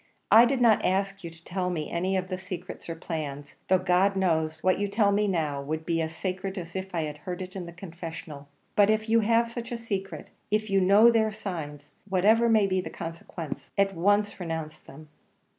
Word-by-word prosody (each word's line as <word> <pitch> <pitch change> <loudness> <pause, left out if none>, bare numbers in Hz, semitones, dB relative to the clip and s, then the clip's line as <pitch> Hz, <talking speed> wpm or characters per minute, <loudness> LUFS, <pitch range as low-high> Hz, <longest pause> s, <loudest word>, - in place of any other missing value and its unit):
I 230 +2 +9
do 265 +2 +1
not 235 -4 +4
ask 195 +1 0
you 170 - -5
to 165 0 -12
tell 180 0 -2
me 160 -4 -3
any 185 +3 0
of 185 0 -2
their 185 -1 -3
secrets 180 -2 -7
or 165 - -3
plans, 150 -4 -6
though, 185 - +5
God 185 +2 +2
knows, 160 -4 0
what 185 0 +3
you 205 - 0
tell 200 0 +2
me 205 +1 +2
now 155 -7 -1
would 155 +3 -4
be 165 -1 0
as 160 0 -4
sacred 190 +2 -4
as 170 -1 -7
if 190 -1 -5
I 160 -2 0
heard 175 +5 -7
it 185 0 -7
in 180 -3 -5
the - - -8
confessional; 165 -4 -8 0.3
but 205 0 +5
if 215 0 +1
you 230 +1 +5
have 230 +1 +2
such 235 0 -6
secrets, 200 -4 -5 0.2
if 215 0 0
you 195 0 +4
know 205 +5 +7
their 220 -1 +2
signs, 160 -9 -6 0.2
whatever 215 +5 +4
may 220 -2 +5
be 185 -1 +1
the - - -7
consequence, 165 -1 -7
at 195 0 +3
once 205 +4 +1
renounce 160 -3 -4
them." 155 +2 -14
185 Hz, 210 wpm, -27 LUFS, 165-205 Hz, 0.3 s, I